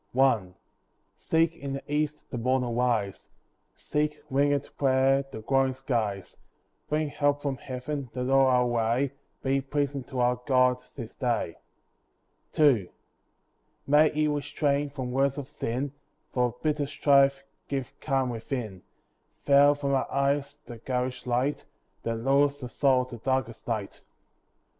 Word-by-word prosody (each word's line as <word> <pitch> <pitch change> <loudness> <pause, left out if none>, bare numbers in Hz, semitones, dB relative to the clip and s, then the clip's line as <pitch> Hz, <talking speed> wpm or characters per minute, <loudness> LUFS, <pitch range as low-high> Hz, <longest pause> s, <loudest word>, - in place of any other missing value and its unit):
I 125 -8 +4 0.7
See 160 0 +2
in 165 -4 -3
the 135 - -5
east 150 0 -2
the 125 - -3
morn 130 +2 +1
arise; 120 -4 -1 0.5
Seek, 150 0 -2
wingèd 140 +1 +1
prayer, 135 0 +3
the 110 - -7
glowing 135 +2 +2
skies; 110 -8 -3 0.5
Bring 150 0 0
help 145 0 0
from 140 -2 -1
Heaven, 130 +2 -5
that 125 0 -2
all 135 0 +5
our 125 -1 +4
way 120 +3 +1 0.3
Be 135 +1 +1
pleasing 140 0 -2
to 130 -2 -5
our 125 0 +2
God 125 -2 +3
this 115 -5 -7
day. 120 - -1 1.0
II 130 - +4 1.0
May 150 +2 +5
He 155 0 0
restrain 145 0 0
from 130 -3 -5
words 135 +2 +1
of 140 -2 -5
sin; 130 +2 -3 0.4
For 125 -2 +1
bitter 150 -2 0
strife 140 -1 +3 0.2
give 135 -3 -3
calm 135 -3 0
within; 115 -4 -5 0.6
Veil 145 +1 +6
from 140 -1 -1
our 135 - 0
eyes 140 +1 0
the 120 -2 -9
garish 125 +1 -3
light, 125 +4 0 0.4
That 115 - -2
lures 140 +4 +2
the 125 -3 -6
soul 130 +1 +2
to 125 -2 -9
darkest 130 -1 -2
night. 110 -4 -4
135 Hz, 140 wpm, -27 LUFS, 125-145 Hz, 1.0 s, Veil